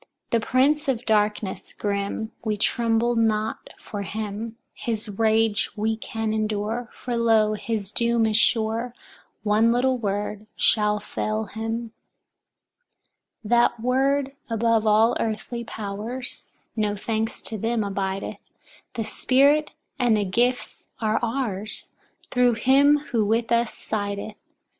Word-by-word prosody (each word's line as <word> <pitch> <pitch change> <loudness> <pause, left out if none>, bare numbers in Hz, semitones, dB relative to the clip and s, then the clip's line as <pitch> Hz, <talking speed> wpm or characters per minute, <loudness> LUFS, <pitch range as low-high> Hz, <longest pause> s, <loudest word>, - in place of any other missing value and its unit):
The 230 - +3
Prince 275 +6 +2
of 250 -2 0
Darkness 210 -2 0
grim, 200 +2 -2
we 215 -2 -1
tremble 230 +2 +1
not 220 -1 0
for 205 - -6
him; 215 +3 -5 0.2
his 225 -2 -3
rage 220 +1 +2
we 220 +1 0
can 225 0 -3
endure, 215 +2 -2
for 245 -1 -4
lo, 225 -2 +3
his 210 -2 -3
doom 235 0 +2
is 215 -1 +1
sure; 225 +2 +2 0.5
one 220 +2 +4
little 255 +1 +2
word 210 0 -3
shall 210 -1 +3
fell 215 +1 -2
him. 225 +2 -4 1.5
4. 210 - -8
That 240 -1 +4
word 270 +3 +1 0.2
above 225 -1 +2
all 220 +2 +5
earthly 225 +2 -3
powers, 220 +4 -5 0.3
no 210 -2 0
thanks 220 +2 -2
to 220 - -4
them, 225 +1 0
abideth; 195 -1 -3 0.6
the 230 - -1
Spirit 280 +7 +3 0.3
and 240 -4 +4
the 205 - 0
gifts 245 +6 -1
are 220 -1 +1
ours, 225 -4 -3 0.4
thru 250 -1 +4
him 275 +5 +5
who 230 -3 +2
with 225 +3 0
us 235 -1 +3
sideth. 205 0 -4
225 Hz, 125 wpm, -24 LUFS, 210-235 Hz, 1.5 s, all